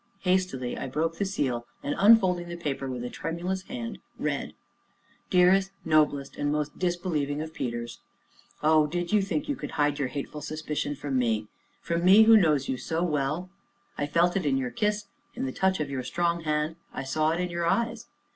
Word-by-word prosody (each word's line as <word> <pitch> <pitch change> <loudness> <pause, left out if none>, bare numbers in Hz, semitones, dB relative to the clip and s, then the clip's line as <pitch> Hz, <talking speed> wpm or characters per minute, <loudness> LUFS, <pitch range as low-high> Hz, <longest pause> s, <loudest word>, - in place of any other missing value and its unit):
Hastily 180 -10 0
I - - -4
broke 160 +5 -2
the 200 - +1
seal, 130 -11 -2 0.2
and, 145 - -1
unfolding 190 -5 +5
the 170 - -5
paper 140 -5 -3
with 125 -1 -4
tremulous 175 +4 -3
hands 230 +2 -6 0.2
read: - - -2 0.7
"DEAREST, 185 +1 +4 0.2
NOBLEST, 150 -3 +2
AND 145 0 0
MOST 150 -1 -2
DISBELIEVING 175 -5 -1
OF 160 +1 -5
PETERS, 120 -3 -4 0.6
Oh, 155 0 +5
did 175 +4 -3
you 210 - +5
think 185 -6 -2
you 290 - -1
could - - -7
hide 145 0 +1
your 140 - +1
hateful 145 +2 -5
suspicion 150 -1 -3
from 135 -2 -1
me 110 -3 0 0.3
from 170 0 -1
me 195 +4 +8
who 225 0 +8
know 170 -8 +5
you 135 -2 -2
so 165 +6 -2
well? 155 +3 -1 0.4
I 145 - -2
felt 170 +4 +2
it 195 - +1
in 140 -3 +2
your 125 -2 -2
kiss, 210 - 0 0.3
in 255 +2 -2
the 265 - -2
touch 190 0 +1
of 145 -2 -2
your 130 -2 -2
strong 170 +3 -1
hand, 150 +1 0
I - - -5
saw 155 +4 +1
it 165 +2 0
in 180 -1 -2
your 170 0 -1
eyes. 230 +4 0
160 Hz, 190 wpm, -27 LUFS, 145-180 Hz, 0.7 s, me